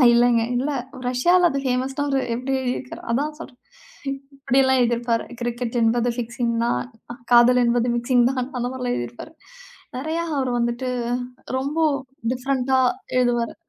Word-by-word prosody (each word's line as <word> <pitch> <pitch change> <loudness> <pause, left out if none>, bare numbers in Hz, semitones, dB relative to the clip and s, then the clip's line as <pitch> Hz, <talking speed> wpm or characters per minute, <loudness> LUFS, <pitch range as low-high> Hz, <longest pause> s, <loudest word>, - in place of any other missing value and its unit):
இல்லைங்க, 240 -1 +4
இல்லை 275 +4 0 0.3
ரஷ்யாவுல, 345 +8 +4
அது 275 - -1
ஃபேமஸ்ஸ்டாரு. 270 +2 0 0.2
எப்படி 255 +3 -3
எழுதியிருக்காரு? 255 0 -4
அதான் 295 +5 -1
சொல்றேன். 245 -5 -11 0.8
இப்படிலாம் 265 -1 +3
எழுதி 240 0 +2
இருப்பாரு. 235 -1 -1 0.2
கிரிக்கெட் 240 0 -2
என்பது 235 +1 +2
ஃபிக்சிங் 235 0 -2
தான். 235 - +1 0.5
காதல் 245 +1 +6
என்பது 240 0 +2
மிக்சிங் 240 0 +3
தான். 255 -2 -2
அந்த 245 - -1
மாரி 260 - -7
எல்லாம் 245 -1 -1
எழுதி 120 - -3
இருப்பாரு. 315 - -11 0.6
நெறைய, 315 +5 -2 0.2
அவர் 260 -2 0
வந்துட்டு, 240 +2 -1 0.7
ரொம்ப 280 +4 -3 0.5
டிஃப்ரண்ட்டா 260 0 +1 0.4
எழுதுவாரு. 240 -2 +1
250 Hz, 135 wpm, -23 LUFS, 240-265 Hz, 0.8 s, காதல்